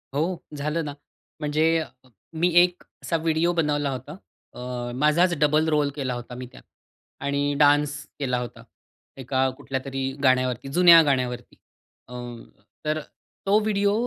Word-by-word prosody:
हो, 170 +4 0 0.2
झालं 150 +3 -2
ना. 145 - -5 0.5
म्हणजे 150 +1 +1
अ, 160 - -5 0.4
मी 170 +3 +2
एक 180 0 0 0.2
असा 165 - -1
व्हिडिओ 165 +1 +1
बनवला 150 -3 0
होता. 135 +4 -6 0.4
अ, 125 -1 -5
माझाच 160 +5 +3
डबल 150 +2 +3
रोल 150 -2 +2
केला 135 -4 -2
होता 120 0 -7
मी 125 +1 -6
त्यात - - -15 0.6
आणि 140 0 0
डान्स 145 0 +4 0.3
केला 125 -3 0
होता, 120 -1 -7 0.5
एका 130 0 0
कुठल्यातरी 135 -1 -3
गाण्यावरती, 130 -1 +2
जुन्या 170 -2 +9
गाण्यावरती. 125 -4 -1 0.5
अ, 125 - -12 0.7
तर 155 +1 0 0.5
तो 205 +2 +4
व्हिडिओ 205 -1 +1
145 Hz, 135 wpm, -24 LUFS, 130-160 Hz, 0.7 s, जुन्या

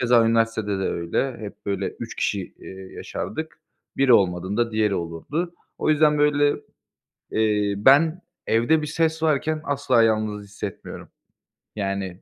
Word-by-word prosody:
keza 120 -2 +4
üniversitede 115 -3 +1
de - - -2
öyle. 85 +10 -2
Hep 105 -2 -10
böyle 100 -1 -1
3 - - -6
kişi - - -2
eee, 95 0 -10
yaşardık. 160 0 -6 0.4
Biri 135 -2 +4
olmadığında 100 +3 +2
diğeri 110 -2 +1
olurdu. 95 - -3 0.2
O - - +1
yüzden, 150 0 +4
böyle, 145 0 +3 0.8
eee, 105 -2 +1
ben 145 - +5 0.3
evde 120 +8 +3
bir - - -3
ses 160 +1 0
varken 155 0 +1
asla 135 -4 +2
yalnız 110 -2 0
hissetmiyorum. 100 -1 -8 0.7
Yani, 100 -3 -3
115 Hz, 135 wpm, -23 LUFS, 100-145 Hz, 0.8 s, ben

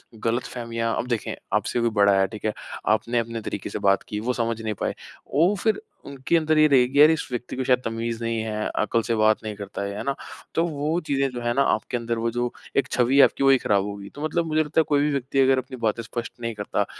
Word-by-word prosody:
गलतफहमियाँ 115 0 -2
अब 125 - -2
देखें, 120 -3 -2 0.2
आपसे - - 0
कोई 120 0 +2
बड़ा 100 -2 +4
है, 95 - +3
ठीक 110 0 -9
है? 110 - +1 0.4
आपने 110 +3 +2
अपने 115 0 -4
तरीके - - -5
से - - -4
बात 100 0 +3
की, 105 - -3
वो 125 +3 -1
समझ 115 -1 -2
नहीं 110 -1 -2
पाए। - - -1 0.4
वो 170 +7 +4
फिर 220 - +1 0.3
उनके 140 +4 -1
अंदर 155 -1 +1
ये 155 - +7
रहेगी, 135 0 +3
"यार, 150 - +9
इस 160 - -1
व्यक्ति 120 0 -4
को 130 - -2
शायद 125 0 +3
तमीज़ 115 0 -3
नहीं 115 0 -1
है, 110 -1 -2
अकल 110 +2 +1
से 115 - 0
बात 110 0 +4
नहीं 105 -1 -5
करता 100 -1 -6
है।" 100 0 -4
है - - -4
ना? 140 - -1 0.4
तो 165 - +3
वो 155 +1 -1
चीज़ें 135 -1 +1
जो 120 - -6
है 120 0 0
ना, 140 - +2
आपके 120 -1 0
अंदर 115 0 -2
वो 115 +1 0
जो 120 0 -1 0.3
एक 140 - +3
छवि 125 +2 +2
है 140 - +9
आपकी, 140 - +2
वही 135 -1 +6
खराब 100 -4 +1
होगी। 100 -1 -7
तो 145 - -6
मतलब 165 +2 0
मुझे 155 0 +2
लगता 150 +1 0
है - - +1
कोई 145 -1 +3
भी 150 0 +1
व्यक्ति 135 0 -1
अगर 135 0 +5
अपनी 130 0 -5
बातें 115 -1 0
स्पष्ट 115 +2 -5
नहीं 115 0 -2
करता 105 - -1
120 Hz, 255 wpm, -24 LUFS, 110-140 Hz, 0.4 s, यार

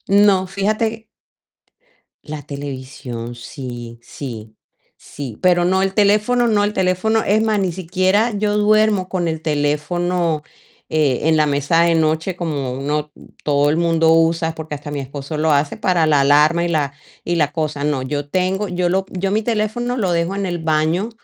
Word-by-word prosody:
No, 200 -1 +4
fíjate 215 +3 -1 1.2
La 150 -1 -7
televisión 130 -4 -7
sí, 120 -1 -8
sí, 115 -5 -8 0.4
sí, 130 -7 -9
pero 175 -1 +3
no 190 +1 +2
el 195 0 -1
teléfono 210 +4 +3
no 210 -3 +2
el 205 - +1
teléfono. 190 +4 +1
Es 215 +2 +2
más, 220 -2 +1
ni 190 -2 0
siquiera 185 +5 +1
yo 210 0 0
duermo 210 -2 +3
con 180 -2 -1
el 160 -1 -3
teléfono, 155 +2 0 0.5
eh, 150 -5 +1
en 160 - +4
la 155 -1 +3
mesa 145 +3 +2
de 170 0 +3
noche 160 +3 0
como 145 -7 -3
uno 150 +3 -2 0.3
todo 145 0 +2
el 155 - 0
mundo 165 -1 +3
usa, 165 0 +2
porque 160 -1 -6
hasta 145 +1 -8
mi 145 - -3
esposo 140 +3 -6
lo 155 +1 +2
hace 145 0 +1
para 175 -3 +2
la 150 -3 +3
alarma 150 +4 +4
y - - 0
la 150 -4 0 0.3
y 175 0 -1
la 150 -3 +1
cosa. 155 -2 -3
No, 145 -3 0
yo 145 +2 -4
tengo, 190 +4 0
yo 180 -1 -1
lo 190 +2 0
yo 190 +1 -2
mi 215 +2 +1
teléfono 235 +2 -1
lo 195 -6 0
dejo 170 +3 0
en 200 0 -2
el 175 -2 -3
baño 160 +6 0
165 Hz, 175 wpm, -19 LUFS, 145-190 Hz, 1.2 s, No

